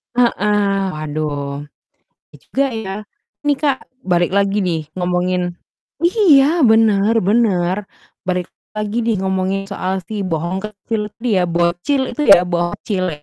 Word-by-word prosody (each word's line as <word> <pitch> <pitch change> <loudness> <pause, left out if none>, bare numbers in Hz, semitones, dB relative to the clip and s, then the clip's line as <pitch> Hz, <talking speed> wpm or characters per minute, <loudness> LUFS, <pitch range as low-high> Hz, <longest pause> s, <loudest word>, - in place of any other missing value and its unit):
Heeh, 205 -4 +2
waduh. 145 -2 -4 0.7
iya - - -13
juga 275 +1 0
ya. 200 -4 -4 0.5
Ini, 290 - +4
Kak, 275 -2 +1 0.2
balik 175 -1 +1
lagi 200 0 +2
nih 160 -5 -2
ngomongin 180 0 0 0.5
iya 340 -5 +4
bener 220 -1 +4
bener. 190 -4 +2 0.5
Balik 180 -1 -1 0.3
lagi 215 +2 -2
nih 230 -1 +1
ngomongin 190 +1 -1
soal 190 -1 -2
si 210 +3 -5
bohong 180 0 -2
kecil 210 +1 -4
itu 230 +3 -3
ya, - - +2
bocil 175 - +1
itu 300 - -2
ya 175 - +9
bocil 175 +2 -2
ya, 150 -2 -6
195 Hz, 130 wpm, -18 LUFS, 175-220 Hz, 0.7 s, ya